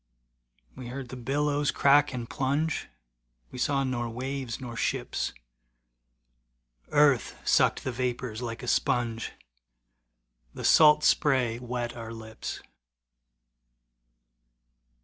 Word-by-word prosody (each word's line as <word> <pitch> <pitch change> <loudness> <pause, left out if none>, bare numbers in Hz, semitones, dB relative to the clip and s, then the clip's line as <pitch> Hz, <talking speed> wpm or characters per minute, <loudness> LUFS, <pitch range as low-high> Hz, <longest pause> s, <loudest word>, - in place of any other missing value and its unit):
We 125 - -8
heard 130 0 -6
the 130 - -7
billows 145 +3 0
crack 145 +1 +4
and 120 -3 -5
plunge, 145 +5 -1 0.6
We 125 - -8
saw 140 +1 +1
nor 120 -3 -2
waves 130 +1 -4
nor 120 -3 -7
ships. - - -2 1.6
Earth 145 -4 +3
sucked - - +3
the 130 - -2
vapors 125 -2 -3
like 120 0 -5
a - - -6
sponge, 120 -2 0 1.2
The - - -5
salt 150 -1 +7
spray 125 -5 +2
wet 120 -1 -4
our 115 -1 -7
lips. 110 -1 -7
125 Hz, 105 wpm, -28 LUFS, 120-140 Hz, 1.6 s, salt